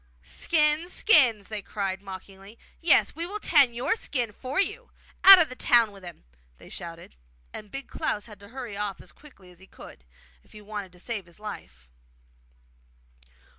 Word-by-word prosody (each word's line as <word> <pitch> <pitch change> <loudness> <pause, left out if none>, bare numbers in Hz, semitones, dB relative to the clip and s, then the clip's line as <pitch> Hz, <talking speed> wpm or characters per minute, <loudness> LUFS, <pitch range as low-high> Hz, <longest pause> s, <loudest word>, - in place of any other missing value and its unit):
'Skins! 300 - 0
skins!' 245 - +3
they 215 -2 -4
cried 195 -2 -4
mockingly; 195 +2 -11 0.2
yes, 330 -4 +3
we 330 - -5
will 415 +3 -6
tan 285 - +4
YOUR 255 - 0
skin 245 - -3
for 260 - -4
you! 435 +5 -2 0.3
Out 390 -1 +12
of 330 - +4
the 255 - -8
town 235 -4 +3
with 195 -2 -15
him!' 175 -1 -11 0.3
they - - -16
shouted; 170 - -9 0.4
and 210 - -9
Big 275 +5 -7
Klaus 205 - -3
had 210 -3 -13
to 200 - -14
hurry 240 -2 -8
off 200 -1 -4
as - - -13
quickly 205 -12 -18
as 175 - -19
he 190 - -17
could, - - -14 0.4
if - - -24
he 210 - -12
wanted 205 -2 -7
to 180 - -17
save 205 -2 -5
his 170 +3 -13
life. 65 - -10
215 Hz, 175 wpm, -26 LUFS, 195-285 Hz, 0.4 s, Out